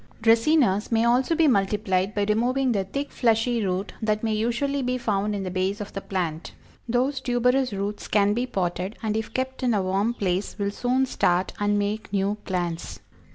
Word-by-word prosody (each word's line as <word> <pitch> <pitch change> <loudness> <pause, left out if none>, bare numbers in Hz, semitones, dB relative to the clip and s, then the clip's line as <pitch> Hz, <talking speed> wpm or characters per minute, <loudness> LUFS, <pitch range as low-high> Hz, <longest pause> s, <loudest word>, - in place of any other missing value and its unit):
Dracænas 230 -2 +3
may 225 0 +3
also 250 +7 +3
be 325 -1 +4
multiplied 195 -4 +1
by 205 - +1
removing 250 +5 +1
the 200 -4 0
thick, 280 +9 -4
fleshy 230 0 +1
root 190 +1 -2
that 215 0 0
may 220 -1 +1
usually 240 +6 0
be 250 0 -1
found 210 -3 -1
in 195 - -3
the 185 - -4
base 185 +2 -1
of 205 - -7
the 195 - -4
plant. 170 -5 -3 0.4
Those 255 +3 +1
tuberous 250 +1 +1
roots 200 +1 -4
can 205 0 +3
be 245 +3 -1
potted, 185 -2 -2
and 215 -1 -1
if 220 0 -3
kept 260 +2 -3
in 245 -3 +2
a 200 - +1
warm 195 +5 0
place 190 -2 -2
will 200 -1 -1
soon 250 +5 +1
start 180 -7 +1
and 205 0 +1
make 205 +1 -2
new 200 0 +1
plants. 175 -3 -3
215 Hz, 190 wpm, -25 LUFS, 195-245 Hz, 0.4 s, be